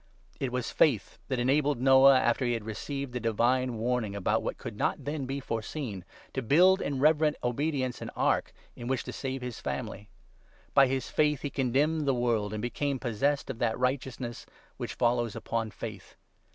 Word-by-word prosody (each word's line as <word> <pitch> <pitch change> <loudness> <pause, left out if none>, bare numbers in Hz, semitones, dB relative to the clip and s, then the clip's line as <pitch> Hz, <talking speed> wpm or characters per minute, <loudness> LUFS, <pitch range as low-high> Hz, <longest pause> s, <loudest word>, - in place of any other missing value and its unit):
It 130 -2 -2
was 125 -1 -2
faith 125 -10 +2
that 130 - -1
enabled 140 +2 +2
Noah, 135 +1 +7
after 120 +1 +1
he 120 -1 +1
had 115 -3 -3
received 135 +4 -5
the 125 - -2
divine 120 +2 +1
warning 115 -3 -1
about 100 - +1
what - - -3
could - - -7
not - - -1
then 145 -2 -3
be 135 +1 -3
foreseen, 115 - -4 0.3
to 135 - -1
build, 180 - +5
in 140 -2 -2
reverent 150 +1 +4
obedience, 130 0 -1
an - - -5
ark - - +1 0.2
in 120 - -7
which 130 -1 0
to - - -7
save 135 -1 -4
his 125 -3 -5
family. 105 -4 -5 0.6
By 135 -1 +7
his 130 -1 -2
faith 150 -2 +2
he 145 - -2
condemned 145 +4 +1
the 135 - +3
world, 115 -4 0
and 105 0 -4
became 140 +3 -1
possessed 135 +4 0
of 115 - -9
that 115 -2 +1
righteousness 125 -2 -2 0.3
which - - -5
follows 120 -2 +1
upon 115 0 -2
faith. 105 -2 -8
125 Hz, 180 wpm, -29 LUFS, 115-140 Hz, 0.6 s, Noah